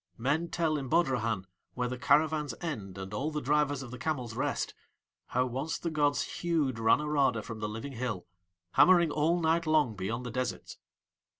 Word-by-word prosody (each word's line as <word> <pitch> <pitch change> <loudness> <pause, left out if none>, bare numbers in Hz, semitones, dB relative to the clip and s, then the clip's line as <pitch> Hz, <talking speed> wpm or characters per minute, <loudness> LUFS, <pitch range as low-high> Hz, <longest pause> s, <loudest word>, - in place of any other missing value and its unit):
Men 150 +8 0
tell 160 -2 0
in 135 - -5
Bodrahan, 120 - +1 0.3
where 125 -1 -1
the 125 - -3
caravans 150 +4 +2
end 105 - -5
and 95 +1 -7
all 135 +8 -1
the 150 -1 -2
drivers 145 0 +1
of 120 - -9
the 125 - -8
camels 125 -4 -2
rest, - - -1 0.5
how 125 +1 +1
once 135 +6 -3
the 170 - -3
gods 145 -2 +2 0.2
hewed 155 -9 0
Ranorada 135 -1 +2
from 110 0 -7
the 105 0 -2
living 115 +6 -6
hill, 115 -7 -3 0.5
hammering 175 - +6
all 160 +4 +2
night 165 0 +1
long 150 -8 +3
beyond 110 +6 -3
the 120 - -4
deserts. 125 +1 -4
135 Hz, 175 wpm, -30 LUFS, 115-155 Hz, 0.5 s, hammering